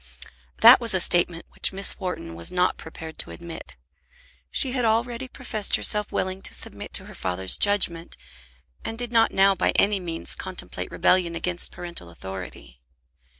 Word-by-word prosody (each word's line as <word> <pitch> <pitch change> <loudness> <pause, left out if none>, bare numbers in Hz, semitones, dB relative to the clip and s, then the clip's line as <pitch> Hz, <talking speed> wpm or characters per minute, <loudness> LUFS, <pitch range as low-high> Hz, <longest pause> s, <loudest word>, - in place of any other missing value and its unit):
That 235 +3 +9
was 230 -4 +4
a - - +2
statement 175 -1 +2
which - - +2
Miss 195 +1 +2
Wharton 180 - -5
was 85 0 -3
not 180 0 +1
prepared 160 0 -11
to - - -3
admit. 170 -1 -7 0.7
She 265 - +4
had 250 -1 -1
already 235 +3 -1
professed 225 -5 0
herself 210 -1 +1
willing 185 +1 -3
to - - +1
submit - - -2
to - - -1
her - - -12
father's 95 +1 0
judgment, 180 -5 +1 0.7
and 225 - -5
did 240 0 -5
not 230 -1 +3
now 195 +1 +4
by - - 0
any 200 0 +3
means 170 -2 -2
contemplate - - -5
rebellion 175 -2 +1
against 175 +1 -3
parental 170 - -8
authority. 85 -9 -10
185 Hz, 160 wpm, -24 LUFS, 165-220 Hz, 0.7 s, That